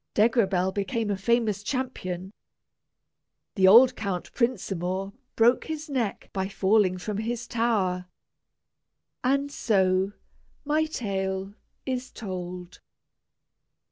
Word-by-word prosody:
Degrabell 200 -5 +3
became 205 +2 -1
a - - +1
famous 215 0 +1
champion. 205 -7 -4 1.2
The 190 -3 +4
old 245 +5 +8
Count 195 -5 -4
Prinsamour 195 -5 -1 0.2
broke 235 +2 +4
his 310 -1 -5
neck 240 -7 -2
by 190 -1 -1
falling 195 -1 +2
from 200 +3 -4
his 235 +2 -3
tower; 200 -7 0 1.2
and 275 +3 +1
so, 190 -4 +1 0.5
my 305 +2 +2
tale 195 -8 -3 0.3
is 260 -1 -3
told! 180 -4 -7
205 Hz, 100 wpm, -26 LUFS, 190-240 Hz, 1.2 s, old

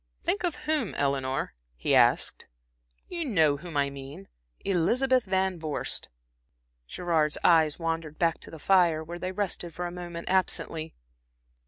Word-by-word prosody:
"Think 205 - 0
of 345 -3 0
whom, 300 -9 0
Eleanor?" 135 -1 -1 0.2
he - - 0
asked. - - +3 0.6
"You 345 -2 -3
know 160 - +3
whom 165 0 -6
I 140 -1 +2
mean 135 -7 -10 0.3
Elizabeth 240 +8 +2
Van 190 -2 0
Vorst." 155 -3 -3 0.8
Gerard's 160 - 0
eyes 160 -3 +5
wandered 165 -2 -3
back 165 -1 +1
to - - -6
the 160 - -9
fire, 170 -2 +3
where 170 +2 -7
they 185 +1 -3
rested 185 -4 -2
for 175 - -3
a 175 - -4
moment 175 -1 -7
absently. 165 -3 -1
170 Hz, 145 wpm, -28 LUFS, 155-190 Hz, 0.8 s, eyes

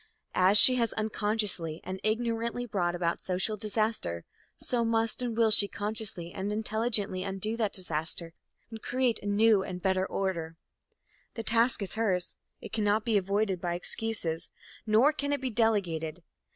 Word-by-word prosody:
As 185 +3 +4
she 255 +4 +8
has 230 -2 0
unconsciously 210 -6 -1
and 185 +1 -6
ignorantly 230 +2 -1
brought 180 -6 -1
about 170 -1 -2
social 185 +4 0
disaster, 215 - -2 0.3
so 240 -2 +1
must 225 +1 0
and 235 -2 -3
will 225 -2 +4
she 205 -1 +8
consciously 205 -5 -5
and 195 +2 -4
intelligently 215 -3 0
undo 195 +3 -3
that 215 -4 0
disaster 165 -1 0 0.4
and 220 -1 -8
create 250 -3 0
a - - -6
new 210 0 +4
and 185 -1 -5
a - - -13
better 190 0 0
order. 165 -4 -3 0.8
The 225 - -5
task 230 0 +3
is 195 - -5
hers. 195 -5 0 0.2
It - - -10
cannot 215 0 +1
be 230 -2 +1
avoided 200 -1 0
by 175 -1 -2
excuses, 175 -3 0 0.4
nor 230 +8 +4
can 285 -1 -3
it 285 - -1
be 260 -1 -3
delegated. 180 -8 -1
210 Hz, 160 wpm, -29 LUFS, 185-225 Hz, 0.8 s, she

